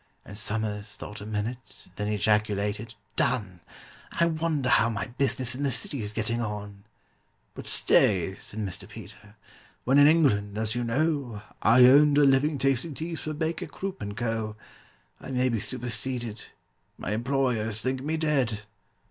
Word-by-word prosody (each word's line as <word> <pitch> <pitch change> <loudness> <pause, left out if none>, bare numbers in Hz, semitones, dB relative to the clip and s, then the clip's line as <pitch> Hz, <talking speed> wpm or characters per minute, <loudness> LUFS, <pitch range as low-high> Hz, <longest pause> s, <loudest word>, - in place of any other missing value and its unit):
And 105 - -10
SOMERS 105 -1 -3
thought 105 0 -9
a 105 - -8
minute, 110 +4 -5
then 105 -1 -3
ejaculated, 105 +1 0 0.2
"Done! 100 -8 -1 0.6
I 170 - +5
wonder 160 -5 0
how 115 - +4
my 105 -4 -3
business 125 0 0
in 130 - -5
the 140 - +1
City's 130 - +1
getting 115 +2 -2
on?" 105 -2 -6 0.7
"But - - -9
stay," 95 -2 +3
said 105 +2 -7
Mr. 95 -4 -5
PETER: 105 0 -12 0.5
"when 135 +3 +4
in 145 - +8
England, 105 -11 +3
as 110 0 -1
you 120 0 -2
know, 130 -3 -1 0.2
I 125 +3 +7
earned 145 +3 +6
a 145 - +6
living 140 +2 +3
tasting 135 +3 0
teas 165 +2 -4
for 155 0 -3
BAKER, 160 +1 -2
CROOP, 190 +6 -6
AND 105 0 -5
CO., 115 -3 -2 0.6
I - - -10
may 130 -1 +1
be 115 -2 0
superseded—my 120 -4 -4
employers 115 -2 0
think 130 +2 -2
me 155 +3 -2
dead!" 135 -9 0
120 Hz, 150 wpm, -27 LUFS, 105-140 Hz, 0.7 s, in